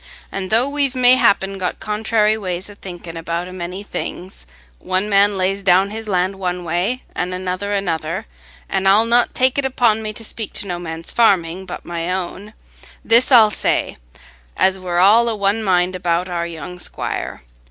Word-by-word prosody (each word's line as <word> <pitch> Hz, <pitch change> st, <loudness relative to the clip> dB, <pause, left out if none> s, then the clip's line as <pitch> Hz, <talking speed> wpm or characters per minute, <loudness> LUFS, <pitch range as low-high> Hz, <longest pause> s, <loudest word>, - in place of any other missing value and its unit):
And 190 Hz, -1 st, -4 dB
though 230 Hz, +4 st, +3 dB
we've 280 Hz, -2 st, 0 dB
mayhappen 225 Hz, -6 st, +3 dB
got 180 Hz, -1 st, -3 dB
contrairy 215 Hz, 0 st, +1 dB
ways 190 Hz, -2 st, -4 dB
o' -, -, -11 dB
thinking 175 Hz, -4 st, -9 dB
about 170 Hz, +1 st, -3 dB
a 185 Hz, -, -9 dB
many 180 Hz, +2 st, -6 dB
things—one 65 Hz, -, -5 dB
man 200 Hz, 0 st, +3 dB
lays 190 Hz, +1 st, 0 dB
down 195 Hz, +1 st, +3 dB
his 220 Hz, +1 st, -6 dB
land 190 Hz, 0 st, 0 dB
one 180 Hz, -1 st, -3 dB
way 180 Hz, +10 st, -1 dB
an' 180 Hz, +1 st, -2 dB
another 185 Hz, +2 st, -3 dB
another—an' 155 Hz, -, -4 dB
I'll 205 Hz, +4 st, +5 dB
not 240 Hz, +1 st, +2 dB
take 260 Hz, +2 st, +2 dB
it 275 Hz, -, 0 dB
upon 235 Hz, -4 st, +2 dB
me 215 Hz, -1 st, -4 dB
to 225 Hz, -, -6 dB
speak 220 Hz, -1 st, -6 dB
to -, -, 0 dB
no 175 Hz, -2 st, -4 dB
man's 165 Hz, -1 st, -4 dB
farming, 190 Hz, -5 st, +2 dB
but -, -, -7 dB
my 170 Hz, +1 st, -3 dB
own—this 210 Hz, +6 st, -1 dB
I'll 225 Hz, -4 st, +7 dB
say, -, -, 0 dB, 0.6 s
as 190 Hz, 0 st, +3 dB
we're 180 Hz, -2 st, -3 dB
all 215 Hz, +6 st, +5 dB
o' 225 Hz, -, -2 dB
one 200 Hz, +2 st, 0 dB
mind 185 Hz, -2 st, +1 dB
about 175 Hz, 0 st, 0 dB
our 170 Hz, -1 st, -3 dB
young 170 Hz, +2 st, -8 dB
squire. -, -, -5 dB
190 Hz, 170 wpm, -19 LUFS, 175-215 Hz, 0.6 s, I'll